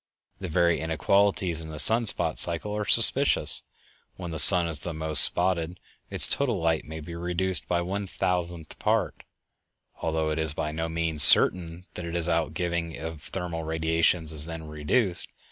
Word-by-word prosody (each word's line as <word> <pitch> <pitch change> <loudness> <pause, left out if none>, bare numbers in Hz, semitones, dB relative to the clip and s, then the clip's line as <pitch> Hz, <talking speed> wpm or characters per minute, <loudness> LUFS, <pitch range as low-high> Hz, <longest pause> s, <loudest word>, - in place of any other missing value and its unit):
The 95 - -7
very 85 0 0
inequalities 90 +2 -1
in 80 - -9
the 75 - -10
sun 115 +8 +2
spot - - +1
cycle 90 +5 +1
are 105 0 -4
suspicious. 130 +6 +4 0.5
When 90 -2 -9
the 80 - -1
sun 85 +3 +7
is 75 -4 -3
most 80 -2 +3
spotted 90 -1 -1 0.3
its - - +5
total 125 -8 0
light 80 -1 -2
may 80 +1 -10
be 85 +3 -11
reduced 90 +2 -3
by 85 0 -2
one 100 +3 -6
thousandth 85 -3 -5
part, - - -2 0.8
although 80 -1 -3
it 75 - -4
is 80 -1 -1
by 75 - -5
no 80 +1 -5
means 80 -2 -1
certain 85 +4 +5
that 90 - -9
its 85 0 -2
outgiving 85 0 -4
of 80 0 -9
thermal 85 -2 -7
radiations 80 0 -1
is 75 +1 -1
then 80 -1 -9
reduced. 85 +6 -1
85 Hz, 160 wpm, -24 LUFS, 80-90 Hz, 0.8 s, sun